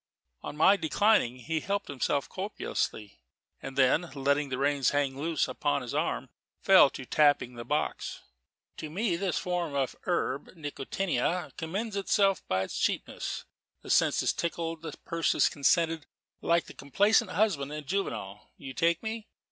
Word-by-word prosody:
On 150 - -7
my 190 +6 +6
declining, 165 - +2
he 160 +6 -2
helped 200 +4 -2
himself 140 0 -1
copiously; 185 - -4 0.4
and 135 - -7
then, 140 +6 +3
letting 140 +1 +1
the 130 - -2
reins 140 0 +2
hang 145 -2 0
loose 160 +1 0
upon - - -1
his - - -6
arm, - - -1 0.3
fell - - +7
to - - -8
tapping 145 -4 +3
the 120 -1 -7
box. 150 +5 -2 0.6
"To 155 - -6
me 185 +3 0
this 185 +1 -1
form 175 -5 -2
of 135 -2 0
the - - -19
herb 145 -3 -1
nicotiana 170 +3 -2
commends 195 +7 -3
itself 195 0 +2
by 95 0 +1
its 95 - -5
cheapness: - - -2 0.4
the - - -4
sense - - +3
is - - +2
tickled, 165 -1 -3
the 165 - -6
purse 165 -1 +2
consenting 165 +2 +2 0.4
like 170 0 +2
the - - -11
complaisant 195 +9 +2
husband 175 -7 +1
in 150 0 -6
Juvenal: 110 - -4
you 135 -2 -8
take 170 - +1
me? 220 0 -4
160 Hz, 155 wpm, -29 LUFS, 140-185 Hz, 0.6 s, fell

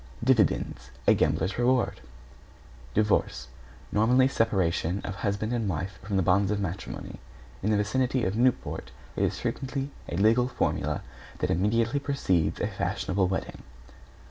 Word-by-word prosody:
=DIVIDENDS= 110 - +2 0.2
A - - +6
gambler's 95 +4 0
reward. 125 0 +2 0.9
=DIVORCE= 100 - +1 0.4
Nominally, 125 +5 +4
separation 95 -7 +1
of 100 - -4
husband 105 +3 -1
and 115 -4 0
wife 90 +3 -4
from 100 0 -2
the 95 - +2
bonds 95 +2 +3
of 105 -1 0
matrimony. 95 -1 -5 0.4
In 105 - 0
the 105 - +3
vicinity 125 +4 +1
of 95 +2 -1
Newport 125 +2 0 0.3
it - - 0
is - - 0
frequently 135 +1 -3 0.2
a 85 - -3
legal 115 +5 +4
formula 125 - -1 0.3
that - - -1
immediately 115 - +1
precedes 95 - 0
a - - 0
fashionable 95 0 -1
wedding. 95 +1 -4
105 Hz, 140 wpm, -27 LUFS, 95-125 Hz, 0.9 s, A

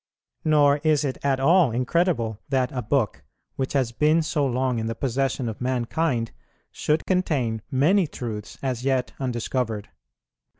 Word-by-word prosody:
Nor 145 -2 +4
is 150 -1 +2
it 130 - -3
at 135 -2 +1
all 165 +2 +5
incredible 125 - 0
that 130 -2 +1
a 125 - -3
book, 115 -2 0 0.3
which 130 -1 -2
has 130 -4 +1
been 155 +6 +3
so 155 -1 0
long 130 -1 0
in 110 - -2
the 115 - -3
possession 130 0 -1
of 110 +1 -6
mankind, 125 0 0 0.4
should 150 +1 0
contain 140 - 0
many 165 +8 +3
truths 110 -7 -6
as 125 -2 -2
yet 130 -2 0
undiscovered. 120 -4 -2
130 Hz, 145 wpm, -24 LUFS, 120-150 Hz, 0.4 s, all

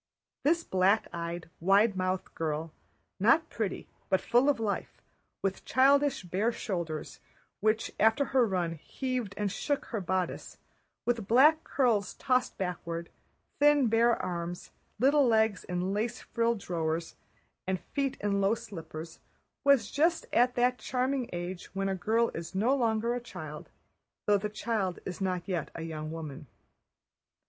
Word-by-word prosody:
This 330 +3 +3
black 190 - +2
eyed, 170 0 -4
wide 200 +4 +4
mouthed 185 0 -2
girl, 160 0 -3 0.5
not 235 - +4
pretty 205 -3 -3 0.2
but 190 - +3
full 245 +4 +3
of 280 - +2
life—with 200 -2 -5
childish 275 -1 +3
bare 190 +6 0
shoulders 170 -9 -4 0.4
which 215 +2 +1
after 225 +6 +4
her 255 -3 +5
run 180 -4 0
heaved 245 - -4
and 205 -2 -1
shook 285 +7 -1
her 220 - -1
bodice, 185 0 -2 0.5
with 235 -5 0
black 300 +7 +6
curls 225 -8 +1
tossed 255 -2 0
backward, 170 -2 -4 0.5
thin 290 -4 +5
bare 230 +1 +3
arms, 175 -1 -4 0.3
little 275 +3 +4
legs 220 -3 +2
in 180 +2 -2
lace 230 +4 -1
frilled 235 0 0
drawers, 165 -2 -2 0.5
and 190 -1 0
feet 275 +4 -2
in 200 -1 +1
low 200 +3 +3
slippers—was 200 - -2
just 330 +3 +2
at 245 +1 +4
that 250 +1 +2
charming 255 0 -1
age 175 +1 -5
when 195 0 0
a 195 - 0
girl 220 +5 +1
is 165 +3 -6
no 230 +8 +3
longer 230 -2 +1
a 245 - -3
child, 155 -9 -8 0.6
though 205 -1 +4
the 210 +2 -3
child 210 -4 -2
is 180 0 -6
not 180 -2 -1
yet 180 -4 -2
a 165 - -5
young 155 -1 -5
woman. 155 -2 -7
205 Hz, 140 wpm, -30 LUFS, 180-245 Hz, 0.6 s, black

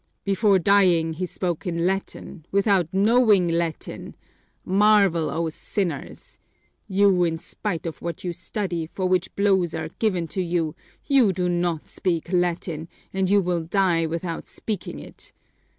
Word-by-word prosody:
"Before 200 0 +3
dying 180 -4 +3
he 180 +3 -3
spoke 180 +2 -3
in 170 -1 -1
Latin, 190 -2 -3
without 195 -4 +2
knowing 205 -1 +4
Latin! 165 -1 -3 0.5
Marvel, 195 -4 +4
O 165 0 -1
sinners! 170 -1 -5 0.5
You, 195 -2 +3
in 165 -1 0
spite 175 +1 -5
of 165 - -5
what 170 -2 -5
you 175 -1 -2
study, 175 -2 -4
for 185 +3 -4
which 185 -1 0
blows 190 -4 +2
are 160 0 -4
given 185 -6 +1
to 190 - -2
you, 170 -3 -1 0.3
you 265 -8 +4
do 180 -1 -1
not 175 -2 -1
speak 175 -1 -2
Latin, 170 -2 -1 0.3
and 190 -1 0
you 200 0 +5
will 175 -2 -1
die 170 -1 +1
without 165 +1 -4
speaking 215 -3 -5
it! - - -13
180 Hz, 145 wpm, -24 LUFS, 170-195 Hz, 0.5 s, you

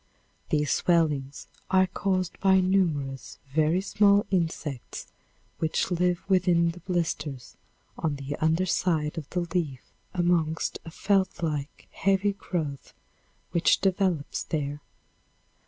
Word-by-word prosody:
These 150 -2 +1
swellings 150 -5 +1 0.2
are 190 0 +5
caused 185 -1 -2
by 190 -1 +5
numerous, 160 -9 0 0.2
very 160 +4 +3
small 200 0 +4
insects 160 -7 -2 0.5
which 160 +3 0
live 180 0 +1
within 180 -3 +3
the 175 - -11
blisters 160 -7 -3 0.4
on 155 -3 0
the 140 +1 -5
under 160 +4 +2
side 160 -4 0
of 150 - -10
the 180 - -1
leaf 170 -7 -2 0.3
amongst 170 -3 0
a - - -6
felt 190 +1 0
like, 150 -3 -3
heavy 195 +1 +1
growth 155 -8 -4 0.6
which 170 -1 +4
develops 185 -6 0
there. 145 -1 -3
170 Hz, 115 wpm, -27 LUFS, 150-185 Hz, 0.6 s, are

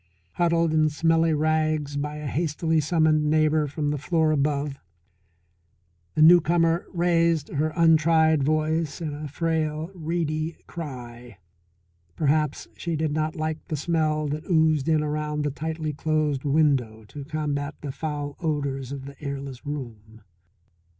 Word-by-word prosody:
Huddled 170 - +2
in 155 -1 +3
smelly 165 +1 +2
rags 155 -1 0
by 150 +1 -3
a 150 0 -7
hastily 160 +2 0
summoned 155 -1 +2
neighbour 155 0 +3
from 145 +1 -2
the 150 - -2
floor 160 +1 +1
above, 145 -1 0 1.4
the 155 - +5
newcomer 170 0 +5
raised 170 -3 +2
her 155 +2 -1
untried 160 -2 +4
voice 155 +2 0
in 155 -3 -4
a 150 +1 -6
frail, 160 +2 -2
reedy 160 -2 -2
cry. 120 - -8 0.8
Perhaps 150 0 0
she 170 -1 -3
did 155 -1 -1
not 155 +1 -1
like 155 0 -2
the 155 - -2
smell 155 -1 0
that 150 +4 -5
oozed 160 -3 +3
in 155 -1 +3
around 150 0 -2
the 145 - -1
tightly 155 +1 -4
closed 150 -2 -1
window 135 -7 +1
to 145 - -8
combat 145 -1 -3
the 145 - -4
foul 145 0 -4
odours 140 -5 -2
of 140 -1 -6
the 140 +1 -11
airless 140 -2 -6
room. 115 -6 -7
155 Hz, 135 wpm, -25 LUFS, 145-160 Hz, 1.4 s, the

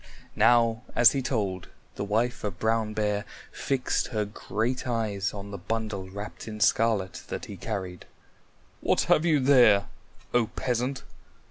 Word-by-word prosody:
Now 115 -2 +4
as 120 -1 +7
he 135 - -1
told, 100 -8 -2 0.3
the - - -4
wife 115 +5 0
of 100 -3 -3
Brown 110 -1 0
Bear 105 -1 0 0.3
fixed 135 -2 -1
her 110 -3 -1
great 115 +5 -3
eyes 105 -5 -1
on 100 0 -8
the 100 - -6
bundle 110 -4 -3
wrapped 100 +4 -8
in 105 -1 -6
scarlet 105 -4 +2
that - - -5
he 100 - -8
carried. 95 -2 -5 0.7
"What - - +2
have 155 - +3
you 155 -4 +4
there, 125 -7 +5 0.4
O 120 -2 +3
Peasant?" 125 +3 -2
110 Hz, 145 wpm, -27 LUFS, 100-120 Hz, 0.7 s, as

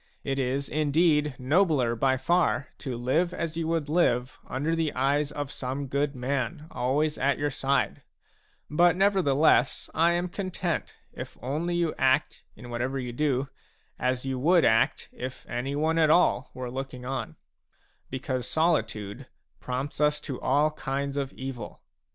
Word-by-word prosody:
It 135 0 -1
is, 135 +1 -1
in 150 0 0
deed, 150 -2 +3
nobler 140 -4 +2
by 130 +2 +2
far 155 +1 +1
to 130 -3 -4
live 160 +9 +1
as 165 -1 -3
you 165 -1 -2
would 165 -3 0
live 135 -5 +1
under 150 +6 -1
the 160 -2 0
eyes 140 +3 +1
of 145 -2 -4
some 135 +2 -4
good 140 +1 -1
man, 140 +4 -2
always 145 +5 0
at 140 +2 +2
your 145 0 -1
side; 135 0 0 0.7
but 175 +3 +4
nevertheless 175 -8 +3
I 170 +2 +4
am 175 +1 0
content 180 -2 -3 0.2
if - - -8
you - - -25
only 170 +5 0
act, 130 +2 +2
in 120 -1 -10
what 120 0 -2
ever 130 +2 -1
you 125 -2 -4
do, 135 0 0 0.5
as 125 0 0
you 130 -1 -2
would 170 +5 +4
act 115 0 +2
if 130 +1 -7
anyone 145 +6 0
at 155 -1 +4
all 155 -6 +3
were 125 -1 -5
looking 130 -1 -6
on; 125 -10 -4 0.7
because 130 -1 -3
solitude 130 -6 0 0.3
prompts 130 +4 -4
us 150 0 +3
to 135 -4 -6
all 150 +2 +3
kinds 140 -1 -3
of 140 -1 -2
evil. 130 -5 -7
140 Hz, 155 wpm, -27 LUFS, 130-155 Hz, 0.7 s, but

